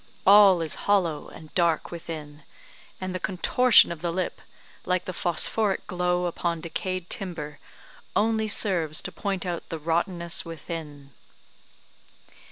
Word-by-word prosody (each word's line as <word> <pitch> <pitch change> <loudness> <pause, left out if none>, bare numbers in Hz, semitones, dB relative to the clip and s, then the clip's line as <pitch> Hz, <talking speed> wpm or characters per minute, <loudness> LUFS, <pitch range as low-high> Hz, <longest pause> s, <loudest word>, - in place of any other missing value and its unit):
All 195 -3 +7
is 160 - -1 0.2
hollow 175 -7 +2
and 155 -1 -13
dark 170 -3 +1
within; 155 -3 -7 0.6
and 185 0 -4
the 185 - -3
contortion 210 +6 +5
of 170 - -6
the 175 - -1
lip, 185 +1 -3 0.4
like 180 0 0
the 185 - -4
phosophoric 190 +4 0
glow 180 0 0
upon 170 -1 -2
decayed 185 +2 -4
timber, 150 -7 -6 0.6
only 220 0 +2
serves 175 -7 0
to - - -5
point 195 -2 -3
out 175 -2 -4
the 165 - -4
rotteness 170 +2 0
within." 155 -4 -8
175 Hz, 130 wpm, -26 LUFS, 165-185 Hz, 0.6 s, All